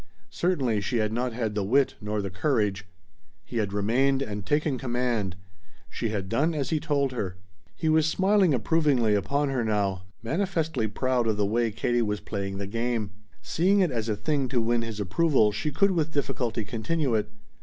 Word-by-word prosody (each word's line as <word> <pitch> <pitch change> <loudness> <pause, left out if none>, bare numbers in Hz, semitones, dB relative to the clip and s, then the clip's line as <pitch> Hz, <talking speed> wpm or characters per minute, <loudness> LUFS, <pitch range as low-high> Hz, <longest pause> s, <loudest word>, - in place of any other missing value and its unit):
Certainly 135 - 0
she 120 +5 -1
had 110 -1 0
not 125 +2 -1
had 110 -3 -2
the 105 - -1
wit 130 +7 +3
nor 105 0 -2
the 95 - -4
courage. 100 -3 0 0.6
He - - -5
had 105 -3 0
remained 130 +7 +2
and 105 -4 -5
taken 145 +3 0
command. 120 -6 -1 0.6
She 115 - -2
had 100 -3 -3
done 150 - +1
as 140 -4 -2
he 155 - +2
told 145 -4 0
her. 95 -7 -4 0.4
He 160 - -2
was 155 0 +4
smiling 190 +2 +3
approvingly 130 -3 +2
upon 140 +9 +1
her 130 -3 0
now, 100 -4 0 0.2
manifestly 160 - -1
proud 125 +2 0
of 110 -2 +1
the 105 - +2
way 115 +3 +1
Katie 120 +3 0
was 105 -2 -1
playing 100 -2 -4
the 100 - -3
game. 115 0 -2 0.3
Seeing 190 +5 +2
it 180 -5 +2
as 115 -2 -2
a 105 - +1
thing 135 +6 0
to 125 0 0
win 115 +1 +1
his 115 -2 -5
approval 110 - +3
she 110 +8 -2
could 195 +7 +2
with 160 -3 0
difficulty 125 -6 -1
continue 125 +6 -1
it. 105 -1 0
120 Hz, 185 wpm, -27 LUFS, 105-145 Hz, 0.6 s, was